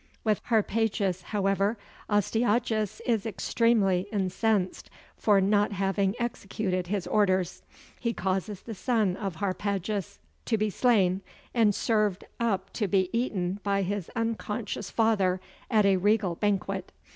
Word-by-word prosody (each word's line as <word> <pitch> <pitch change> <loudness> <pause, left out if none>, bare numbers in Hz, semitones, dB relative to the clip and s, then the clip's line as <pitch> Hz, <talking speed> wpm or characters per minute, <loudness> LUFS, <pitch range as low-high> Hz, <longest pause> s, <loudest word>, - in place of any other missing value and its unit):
With 215 -2 +1
Harpagus, 215 -4 +1
however, 200 +1 +1 0.3
Astyages 215 0 +1
is 230 -3 +1
extremely 205 -3 +2
incensed, 195 0 0 0.3
for 205 -2 +3
not 205 +2 +2
having 195 +1 0
executed 195 -5 -2
his 195 -1 -1
orders: 185 -4 +1 0.4
he 235 - 0
causes 190 0 -2
the 230 - -6
son 215 -3 +1
of 195 -4 -4
Harpagus 200 - -2 0.3
to 225 - +1
be 215 0 0
slain, 195 -5 +3 0.3
and 220 -4 +3
served 210 -4 +1 0.2
up 195 -5 -1
to 210 - -1
be 190 -1 +1
eaten 200 -6 -1
by 200 -1 +1
his 195 -1 -3
unconscious 225 -1 -3
father 200 -5 +2 0.3
at 215 -4 +4
a 195 -1 +4
regal 205 -1 +2
banquet. 195 0 -1
205 Hz, 125 wpm, -28 LUFS, 190-220 Hz, 0.4 s, at